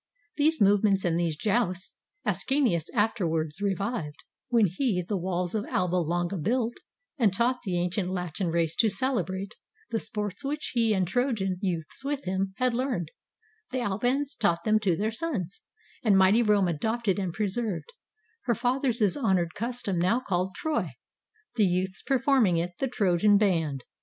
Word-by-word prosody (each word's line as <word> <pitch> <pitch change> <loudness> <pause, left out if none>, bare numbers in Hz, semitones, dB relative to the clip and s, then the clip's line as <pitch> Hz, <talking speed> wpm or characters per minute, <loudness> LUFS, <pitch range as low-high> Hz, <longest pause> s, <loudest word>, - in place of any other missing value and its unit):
These 310 +2 +2
movements 200 -1 +4
and 170 -2 +1
these 170 -2 0
jousts 200 -2 0 0.3
Ascanius 250 - +1
afterwards 175 - 0
revived, 195 -5 -2 0.3
when 230 -3 +4
he 190 - 0
The 205 - -1
walls 180 -1 -2
of 215 -2 -1
Alba 180 0 0
Longa 175 +2 -1
built, 230 +7 0 0.5
and 220 -5 +4
taught 240 +6 +1
The 185 -5 -1
ancient 180 +2 -1
Latin 180 0 -2
race 165 -1 0
to 225 - +4
celebrate 200 -5 -1 0.4
The 225 - 0
sports 210 +1 -4
which 295 +2 -3
he 230 -3 +3
and 185 -2 +1
Trojan 200 -5 0
youths 175 - -3
with 285 0 -3
him 190 +1 -2
Had 255 -1 +1
learned; 235 - -2 0.6
the 255 -1 -2
Albans 245 +7 0
taught 170 -5 +1
them 215 0 +3
to 185 -6 +1
their 215 +2 0
sons; 220 - -3 0.4
And 210 -5 +4
mighty 190 +5 +5
Rome 210 -4 +3
adopted 210 +5 0
and 185 -3 -2
preserved 210 - -2 0.5
Her 235 - +2
fathers' 245 -4 +1
honored 190 - +1
custom, 230 -5 -3
now 185 +8 +2
called 185 -5 -2
"Troy"; 315 -1 -2 0.6
The 215 - +5
youths 185 +1 -1
performing 260 -9 +3
it, 170 +2 -1
"the 270 - 0
Trojan 205 -3 +3
band." 165 - +1
200 Hz, 155 wpm, -27 LUFS, 180-240 Hz, 0.6 s, mighty